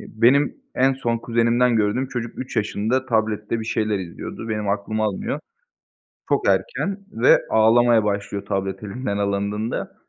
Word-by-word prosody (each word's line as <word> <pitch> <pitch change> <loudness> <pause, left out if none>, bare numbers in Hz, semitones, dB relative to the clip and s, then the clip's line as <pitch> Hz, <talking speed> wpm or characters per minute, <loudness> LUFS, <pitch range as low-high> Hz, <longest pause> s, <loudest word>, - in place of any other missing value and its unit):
benim 125 +6 +2 0.2
en 135 +1 +3
son 120 -3 -1
kuzenimden 115 +1 +2
gördüğüm 110 +5 +1
çocuk 120 -2 -5
3 130 - -6
yaşında 110 +5 0
tablette 110 -1 0
bir - - -5
şeyler 110 -2 0
izliyordu, 95 +5 -7
benim 105 -2 -2
aklım 105 +2 -1
almıyor. 110 +7 -2 0.9
Çok - - +1
erken 200 - 0
ve 115 +3 +5
ağlamaya 115 0 +5
başlıyor 100 -1 -2
tablet 95 0 -3
elinden 105 0 -3
alındığında. 100 +2 -2
110 Hz, 135 wpm, -22 LUFS, 105-120 Hz, 0.9 s, ve